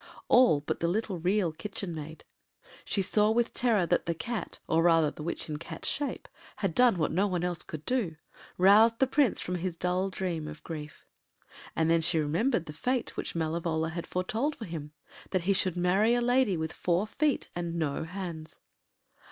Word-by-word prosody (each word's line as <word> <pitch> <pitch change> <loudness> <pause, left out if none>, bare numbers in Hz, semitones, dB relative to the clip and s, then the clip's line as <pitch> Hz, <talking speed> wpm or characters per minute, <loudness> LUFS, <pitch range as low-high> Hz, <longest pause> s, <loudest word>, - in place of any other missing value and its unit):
All 245 - +6
but 150 - -3
the 170 - 0
little 195 0 -1
Real 185 0 +1
Kitchen 195 +1 -6
Maid. 160 0 -8 0.6
She 195 - 0
saw 210 +3 +3
with 230 +1 +1
terror 225 -7 +2
that - - 0
the 170 - 0
Cat, 230 +6 -4
or 160 - +3
rather 165 -3 +4
the - - -10
witch 170 +3 -3
in 150 -2 -4
Cat’s 165 0 -7
shape, 285 0 -2 0.3
had 195 -5 -1
done 245 -3 +4
what 160 - 0
no 190 +6 +2
one 180 -3 -1
else 180 -1 -1
could 155 -1 -7
do—roused 210 +1 +2
the 265 - +4
Prince 265 -3 +2
from 180 - -4
his 175 -1 -3
dull 180 +2 0
dream 175 -5 -3
of 155 0 -9
grief. 150 -2 -8 0.7
And 160 - +2
then 165 0 +3
she 160 +1 +1
remembered 170 - +1
the 150 - -8
fate 250 - -2
which - - -4
Malevola 160 0 -1
had 170 +1 -5
foretold 225 +11 -1
for 225 - -7
him—that 160 +2 -6
he 200 +3 +3
should 185 -2 0
marry 195 +6 +3
a - - +2
lady 245 -5 +2
with 160 0 -3
four 180 +3 0
feet 290 +6 -1
and 170 -1 -3
no 155 -4 -1
hands. 165 -2 -6
180 Hz, 185 wpm, -29 LUFS, 160-210 Hz, 0.7 s, All